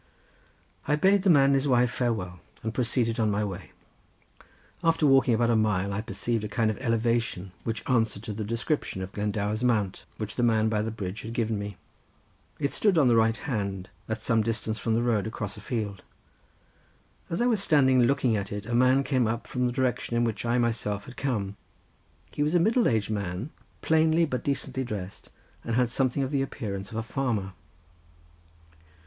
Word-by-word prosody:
I 150 - +3
bade 195 +5 +4
the 195 - +2
man 140 -5 +6
and - - +3
his 135 +1 +2
wife 125 -2 +3
farewell, 100 -9 -2 0.2
and 110 0 -3
proceeded 120 -1 0
on 110 -1 +2
my 105 +1 0
way. 95 -5 -7 1.1
After 165 -1 +3
walking 135 -4 +5
about 120 +1 +2
a - - +3
mile, 100 -3 +1
I 100 - -2
perceived 115 0 -2
a - - -2
kind 110 0 +1
of 110 - -7
elevation 115 -5 0
which 115 -2 -3
answered 115 -5 +1
to 110 -2 -5
the 105 +1 -4
description 115 -2 -2
of 95 - -7
Glendower's 105 +2 -2
mount, 105 -6 0
which 110 0 -5
the - - +1
man 110 -2 +3
by 105 -1 0
the 110 - -2
bridge 105 -2 -5
had 115 +1 -7
given 115 -3 -1
me. 100 -2 -6 0.8
It 140 -1 -1
stood 200 -5 +2
on 140 -5 +5
the 120 - +4
right 115 0 +3
hand, 100 -6 -3 0.2
at 110 0 -3
some 115 -2 +2
distance 110 0 -2
from 115 -1 0
the 120 - +1
road, 110 -4 +1
across 105 -2 -5
a 105 - -10
field. 105 -4 -3 1.3
As 170 - -2
I 240 - +2
was 225 -5 +2
standing 130 -8 +4
looking 125 -2 +2
at 100 -1 -3
it 105 0 -5
a 120 - -4
man 130 +3 +4
came 130 -5 +1
up 115 +1 -2
from 125 -1 -1
the - - -1
direction 125 -2 -1
in 120 - +2
which 115 0 -2
I 120 +1 +2
myself 110 -4 -1
had 125 - -11
come. 105 -7 -2 0.7
He - - -4
was 150 +4 +1
a - - +5
middle 225 +7 +3
aged 110 -2 0
man 100 - -3 0.3
plainly 160 +1 +3
but 125 -6 -3
decently 135 -1 -2
dressed, 100 -5 -6 0.3
and 115 - -2
had 125 -1 +2
something 130 +1 +1
of 135 - -3
the 140 -2 +1
appearance 100 -7 -4
of 110 - -6
a 110 - -1
farmer. 110 -6 -2
115 Hz, 195 wpm, -27 LUFS, 105-130 Hz, 1.3 s, man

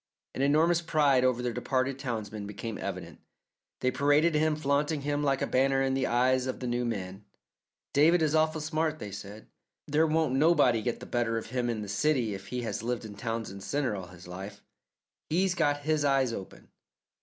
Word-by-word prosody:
An - - -3
enormous 160 +5 +3
pride 145 -5 +3
over 125 -1 +1
their 120 -1 -1
departed 130 +2 -1
townsman 110 -6 -4
became 105 +1 -6
evident. - - -6 0.6
They 130 - +2
paraded 145 +5 +3
him, 155 0 +2
flaunting 145 +1 0
him 145 +1 -1
like 135 -1 +1
a - - +2
banner 135 +1 +2
in 135 0 +1
the 135 -1 0
eyes 130 +2 +2
of 130 - -3
the 130 - -5
new 120 0 -1
man. 100 -3 -4 0.7
"David 160 +4 +5
is 155 -1 +1
awful 155 0 +2
smart," 155 0 -1
they 105 -8 -7
said; 100 +2 -9 0.4
"there 155 +2 +3
won't 160 -3 +1
nobody 135 -5 +4
get 120 +1 -3
the - - -7
better 120 -2 0
of 115 - -6
him 125 -1 -1
in 110 -2 -2
the - - -7
city 120 +1 +1
if 95 0 -8
he 125 -1 -3
has 110 -3 -3
lived 120 0 -3
in 105 - -8
Townsend 110 -2 -4
Centre 135 0 -1
all 95 -3 -6
his 90 0 -13
life. 95 +3 -8 0.7
He's 180 +3 +2
got 145 -4 +1
his 155 0 +1
eyes 135 -4 +2
open. 95 -4 -9
130 Hz, 195 wpm, -29 LUFS, 115-150 Hz, 0.7 s, David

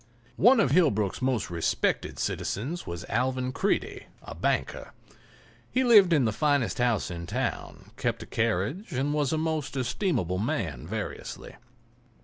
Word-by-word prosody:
One 245 +4 +6
of 140 - +3
Hillbrook's 130 - +2
most 130 -7 0
respected 85 -1 -1
citizens 150 - -3
was 85 -1 -5
Alvan 125 +3 0
Creede, - - -1 0.2
a - - -8
banker. - - -2 0.8
He 260 - +1
lived 210 -7 +7
in 145 -6 +4
the 110 - +2
finest 145 +1 +1
house 120 -6 +1
in 85 -1 -6
town, - - -4
kept - - -2
a - - -11
carriage 115 - -1
and 135 +3 0
was 145 -3 +1
a 160 - +1
most 155 -3 -2
estimable 125 - -1
man 85 - -2
variously. - - -6
130 Hz, 140 wpm, -27 LUFS, 105-155 Hz, 0.8 s, lived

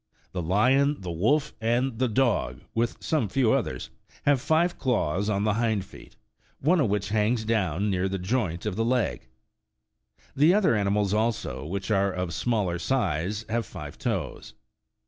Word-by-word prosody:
The 90 - -3
lion, 130 - +3
the 90 -2 -5
wolf, 135 - +1
and 120 +1 0
the 130 - +2
dog, 120 0 0
with 115 +1 0
some 150 -10 0
few 125 0 +2
others, - - -2 0.3
have 145 -3 +3
five 170 +4 +1
claws 105 - 0
on 100 -1 0
the 105 -1 +2
hind 110 -3 0
feet, - - -15 0.4
one 165 +6 +3
of 135 -8 +2
which 100 0 -1
hangs 110 +2 +1
down 100 -3 0
near 95 0 0
the 95 - -2
joint 95 -3 -2
of 105 -3 -2
the 115 - 0
leg. 115 - 0 1.1
The 155 +7 +5
other 195 - +3
animals, 100 -1 +1
also, 110 -5 -1
which 95 +5 -3
are 100 -1 +2
of 90 -2 -3
smaller 100 -4 0
size, 105 - -1
have 115 +1 -1
five 75 -6 -9
toes. - - -3
110 Hz, 165 wpm, -26 LUFS, 95-125 Hz, 1.1 s, The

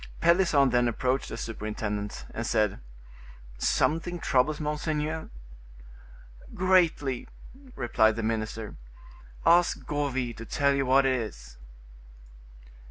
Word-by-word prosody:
Pelisson 170 -6 +4
then 120 0 +3
approached 130 +3 -1
the 115 - -6
superintendent, 105 -2 -4
and - - -3
said: 105 -2 +1 0.8
"Something 165 - +1
troubles 150 -1 +1
monseigneur?" 150 +1 -2 1.3
"Greatly," 170 -8 +2 0.5
replied 110 -3 +2
the 115 - -3
minister; 110 -1 -3 0.7
"ask 175 +1 +4
Gourville 130 -5 -2
to 115 - -7
tell 140 0 +2
you 135 -1 0
what 135 +1 +5
it 135 - +3
is." - - -8
130 Hz, 100 wpm, -27 LUFS, 110-150 Hz, 1.3 s, what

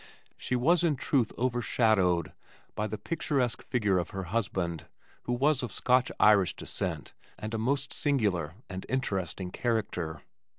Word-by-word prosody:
She 125 - -2
was 165 +8 +3
in 160 -4 +3
truth 130 -3 +1
overshadowed 110 -8 +2 0.4
by 105 - -2
the 110 +1 -4
picturesque 140 -6 -1
figure 105 -6 +1
of 85 - -3
her 95 -1 -4
husband 95 -7 -1 0.4
who 120 - -1
was 140 +3 +2
of 120 -4 -4
Scotch 125 +4 +2
Irish 100 -4 +5
descent - - -4 0.2
and 110 +1 -6
a 110 - -1
most 140 +4 0
singular 100 - 0
and 95 -1 -6
interesting 95 -8 -2
character. 100 -10 -2
110 Hz, 140 wpm, -29 LUFS, 95-130 Hz, 0.4 s, Irish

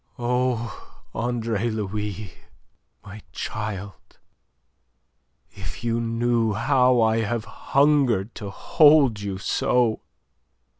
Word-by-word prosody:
"Oh, 125 -2 -2
Andre 115 -2 -1
Louis, 105 -2 -4 0.7
my 100 +1 -10
child, 100 -2 -6 1.3
if 100 +3 -9
you 115 0 0
knew 115 -1 0
how 125 +3 +3
I 110 0 +3
have 115 +1 -2
hungered 130 -3 +1
to 100 - -7
hold 145 +1 +4
you 100 -2 -4
so! 115 +3 +1
115 Hz, 90 wpm, -24 LUFS, 105-120 Hz, 1.3 s, hold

